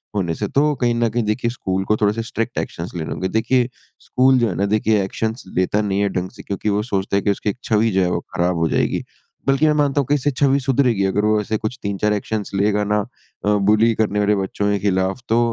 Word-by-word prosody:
होने 85 -5 -1
से, - - -3
तो 150 +2 +2
कहीं 120 -2 +1
न 115 0 +1
कहीं 120 +2 -1
देखिए 115 +3 -1
स्कूल 95 -5 -2
को 105 +2 +1
थोड़े 105 -1 +2
से 115 +1 -3
स्ट्रिक्ट 115 0 -4
एक्शंस 85 +1 -5
लेने 80 -2 -4
होंगे। 95 - -2
देखिए, 120 +2 +1 0.3
स्कूल 130 +1 +3
जो 120 - +2
है 90 - -4
ना 100 - 0
देखिए 105 0 +2
एक्शंस 110 +5 -3
लेता 95 +3 +1
नहीं 100 -2 -1
है 100 - +2
ढंग 90 -1 -3
से, - - -12
क्योंकि 100 +2 -3
वो 105 +1 +1
सोचता 100 -3 -2
है 100 - +2
कि 100 - +2
उसकी 100 - -2
एक 105 - -3
छवि 110 +1 +2
जो 95 0 +2
है, 90 - +1
वो - - 0 0.2
खराब 90 +1 +1
हो 80 -1 +1
जाएगी। - - 0 0.4
बल्कि 135 +3 +3
मैं 155 - +4
मानता 145 -1 +1
हूँ - - -4
कि 145 - +2
इससे 145 0 0
छवि 140 +1 +2
सुधरेगी, 130 -6 +1
अगर 100 +2 +1
वो 105 0 +3
ऐसे 110 +1 -2
कुछ 110 +3 -4
3-4 100 +1 0
एक्शंस 105 0 -3
लेगा 105 +1 +2
ना। 105 +1 +1 0.5
अ, 105 - +3 0.2
बुली 110 +2 +4
करने 105 -1 0
वाले 105 0 +3
बच्चों 100 +1 -2
के 100 - 0
खिलाफ़ 95 +2 0
तो 115 +1 +3
105 Hz, 250 wpm, -20 LUFS, 100-120 Hz, 0.5 s, मैं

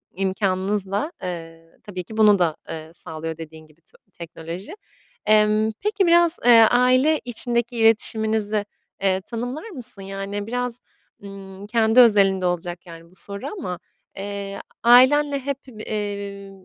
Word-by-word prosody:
imkânınızla, 195 - -1
eee, 165 -2 -7
tabii 185 -4 -6
ki 220 +4 -11
bunu 210 -3 +5
da, 165 -3 +1
eee, 160 0 -7
sağlıyor 160 -1 -6
dediğin 160 -1 -11
gibi 155 +2 -26
to - - -15 0.2
teknoloji. 170 - -8 0.5
Emm, 215 +1 +3
peki 410 -3 +1
biraz, 340 0 +4
eee, 235 -2 +8
aile 255 +5 +3
içindeki 240 0 +1
iletişiminizi, 220 -2 +2 0.4
eee, 190 -1 +1
tanımlar 245 - -6
mısın? 250 - -6
Yani 195 +1 -5
biraz, 245 0 -3 0.4
ımm, 195 0 -10
kendi 225 +1 +3
özelinde 195 -5 +5
olacak 175 0 -3
yani 165 -1 -12
bu 185 - -20
soru 200 +7 -5
ama, 180 - -5 0.4
eee, 200 0 -6 0.2
a 235 - +2
ailenle 280 +3 +5
hep 275 0 -3
bı 220 -4 -11
eee, 200 -2 -5
205 Hz, 135 wpm, -22 LUFS, 185-235 Hz, 0.5 s, eee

